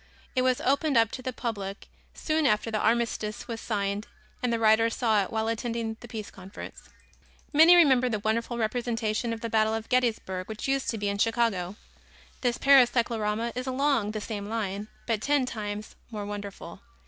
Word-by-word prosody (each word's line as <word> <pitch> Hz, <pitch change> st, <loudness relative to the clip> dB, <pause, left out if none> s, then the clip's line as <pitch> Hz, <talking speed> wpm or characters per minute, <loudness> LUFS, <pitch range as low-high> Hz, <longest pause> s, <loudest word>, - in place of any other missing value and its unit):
It 255 Hz, -, +3 dB
was 255 Hz, -1 st, +2 dB
opened 280 Hz, 0 st, +2 dB
up 225 Hz, -1 st, +4 dB
to 255 Hz, -, -6 dB
the 255 Hz, -, -3 dB
public 205 Hz, -5 st, -5 dB, 0.3 s
soon 310 Hz, -2 st, +1 dB
after 215 Hz, +2 st, +1 dB
the 215 Hz, -, 0 dB
armistice 225 Hz, -2 st, 0 dB
was 230 Hz, -1 st, -5 dB
signed 200 Hz, -1 st, -2 dB, 0.3 s
and 250 Hz, -, 0 dB
the 230 Hz, -, +1 dB
writer 225 Hz, 0 st, +4 dB
saw 225 Hz, -3 st, +2 dB
it 190 Hz, -, -4 dB
while 220 Hz, 0 st, -1 dB
attending 230 Hz, 0 st, -2 dB
the 240 Hz, -, -11 dB
Peace 220 Hz, -3 st, -7 dB
Conference. 195 Hz, 0 st, -10 dB, 0.6 s
Many 325 Hz, +4 st, +8 dB
remember 265 Hz, -7 st, +5 dB
the 220 Hz, -, 0 dB
wonderful 230 Hz, +3 st, -1 dB
representation 230 Hz, 0 st, -1 dB
of 225 Hz, 0 st, -4 dB
the 230 Hz, -, -2 dB
Battle 220 Hz, 0 st, +3 dB
of 225 Hz, 0 st, -5 dB
Gettysburg 220 Hz, -7 st, 0 dB
which 220 Hz, +3 st, -5 dB
used 270 Hz, 0 st, 0 dB
to 225 Hz, -, -1 dB
be 205 Hz, -1 st, -2 dB
in 200 Hz, 0 st, -2 dB
Chicago. 215 Hz, -5 st, +1 dB, 0.7 s
This 245 Hz, -2 st, +1 dB
Paris 270 Hz, -3 st, +6 dB
cyclorama 230 Hz, -2 st, 0 dB
is 250 Hz, +1 st, -4 dB
along 260 Hz, -4 st, +1 dB
the 215 Hz, 0 st, -4 dB
same 205 Hz, -2 st, -5 dB
line, 210 Hz, -2 st, -3 dB, 0.2 s
but 225 Hz, -3 st, -1 dB
ten 285 Hz, 0 st, +2 dB
times 210 Hz, -3 st, -5 dB
more 210 Hz, -3 st, -5 dB
wonderful. 205 Hz, -1 st, -7 dB
225 Hz, 185 wpm, -27 LUFS, 210-245 Hz, 0.7 s, Many